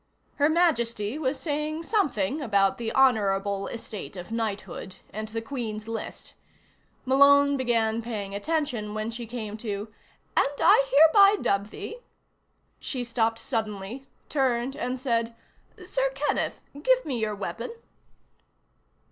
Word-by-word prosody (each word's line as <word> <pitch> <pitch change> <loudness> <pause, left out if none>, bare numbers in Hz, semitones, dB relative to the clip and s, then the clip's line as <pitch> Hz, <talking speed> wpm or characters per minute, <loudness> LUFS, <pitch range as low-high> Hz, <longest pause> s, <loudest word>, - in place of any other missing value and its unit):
Her 290 +1 +4
Majesty 240 -8 +1
was 270 -2 -1
saying 305 +1 -2
something 300 - 0
about 200 -6 +2
the 225 -1 -2
honorable 200 -6 +2
estate 220 -4 -7
of 180 +4 -8
knighthood, 210 -4 -4 0.2
and 215 +2 -4
the 225 +1 -5
Queen's 220 -4 -5
list. 225 -1 -6 0.7
Malone 280 +2 +6
began 230 -3 +1
paying 210 -4 -5
attention 240 -3 -2
when 215 +1 -2
she 235 0 -6
came 215 -3 -5
to:" 210 -1 -5 0.4
and 275 - +4
I 275 - +6
hereby 360 +8 +7
dub 200 +1 0
thee 465 - -7 0.4
" - - -44
She 255 -3 -2
stopped 230 -1 0
suddenly, 225 +2 -4 0.2
turned 260 -2 0
and 250 +1 -3
said: 230 -2 0 0.5
"Sir - - 0
Kenneth, - - -1 0.2
give - - +3
me 260 -6 -2
your 215 -1 -1
weapon." 205 - -5
235 Hz, 130 wpm, -27 LUFS, 215-280 Hz, 0.7 s, hereby